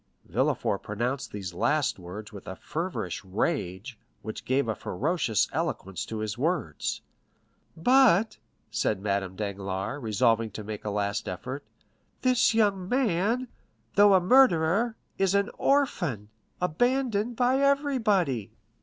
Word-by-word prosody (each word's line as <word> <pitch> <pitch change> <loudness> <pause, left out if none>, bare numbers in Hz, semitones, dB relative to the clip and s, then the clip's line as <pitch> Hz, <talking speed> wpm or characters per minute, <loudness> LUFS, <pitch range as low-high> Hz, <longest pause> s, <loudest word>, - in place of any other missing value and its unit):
Villefort - - 0
pronounced 120 +6 -3
these 95 -4 -6
last 120 - +1
words 100 +5 -9
with 100 - -10
a 95 - -5
feverish 155 - -4
rage, 100 - -2 0.2
which 110 - -6
gave 130 -1 +1
a 110 - 0
ferocious 120 - 0
eloquence 95 -1 -3
to 110 - -5
his 110 +2 -4
words. 145 - -1 0.8
"But"' 225 +1 +4 0.3
said - - 0
Madame 100 -2 -2
Danglars, 100 +4 -4
resolving 115 0 +2
to 110 - -6
make 105 0 -6
a - - -1
last 100 0 -1
effort, 125 +9 -5 0.6
"this 250 -3 +3
young 200 -4 +2
man, 240 0 +1 0.5
though 205 -1 +6
a - - +6
murderer, 220 0 +4 0.2
is 195 0 +2
an 200 0 +1
orphan, 175 - +1 0.3
abandoned 235 +5 +1
by 255 +2 +2
everybody." 220 - +1
140 Hz, 125 wpm, -27 LUFS, -, 0.8 s, though